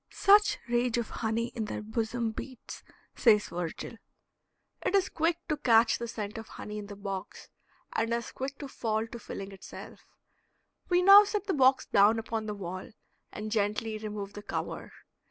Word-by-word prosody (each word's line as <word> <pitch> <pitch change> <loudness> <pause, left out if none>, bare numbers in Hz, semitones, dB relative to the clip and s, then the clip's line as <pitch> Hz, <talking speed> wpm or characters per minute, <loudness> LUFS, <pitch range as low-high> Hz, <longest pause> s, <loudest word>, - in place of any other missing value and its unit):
"Such 415 +1 +5
rage 240 0 +1
of 235 -2 -2
honey 230 +1 -1
in 230 -3 -4
their 210 - -5
bosom 225 +1 -2
beats," 255 +2 -8 0.3
says 210 -4 +4
Virgil. 175 +6 -5 0.9
It 400 - +1
is 390 -2 +3
quick 330 +1 +1
to 305 -2 0
catch 230 -4 +4
the 235 - -4
scent 215 -1 -5
of 225 - -9
honey 210 0 -7
in 205 - -8
the 205 - -8
box, 195 -2 -6 0.4
and 225 +1 0
as 235 0 -2
quick 270 +1 -5
to 285 - -7
fall 220 -4 -1
to 235 +1 -9
filling 195 -2 -7
itself. 195 - -10 0.9
We 355 0 +3
now 400 +2 +10
set 415 0 -2
the 390 - 0
box 265 -1 +4
down 205 +3 +5
upon 225 -1 -3
the 210 - -3
wall 185 -1 -6 0.4
and 215 0 -6
gently 215 +1 -1
remove 210 -2 -6
the 205 - -8
cover. - - -5
225 Hz, 175 wpm, -29 LUFS, 210-255 Hz, 0.9 s, now